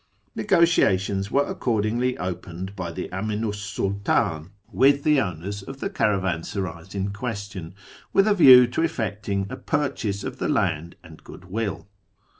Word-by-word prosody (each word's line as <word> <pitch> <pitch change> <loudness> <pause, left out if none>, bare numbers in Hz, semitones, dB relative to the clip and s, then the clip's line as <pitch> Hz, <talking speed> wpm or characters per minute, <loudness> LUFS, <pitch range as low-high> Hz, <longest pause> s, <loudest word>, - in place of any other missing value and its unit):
Xegotiatious 100 - +2
were 140 +3 +2
accordingly 120 +2 -1
opened 90 +1 -5
by 90 -3 -4
the - - -5
Aminu 105 +3 -2
's 105 - -7
Sultdn 100 -4 -1 0.2
with 140 +3 +4
the 150 -3 +4
owners 90 +3 -4
of 135 +7 -9
the 195 - -3
caravansarays 95 - -2
in 100 0 -2
question, 100 -6 -6 0.4
with 195 +1 +4
a 210 - +5
view 130 -9 +9
to 120 +6 -2
effecting 105 -9 -2
a - - -3
purchase 125 -9 -2
of - - -5
the - - -1
land 85 +3 0
and 80 -2 -14
"goodwill." 100 +2 -5
100 Hz, 140 wpm, -24 LUFS, 95-125 Hz, 0.4 s, view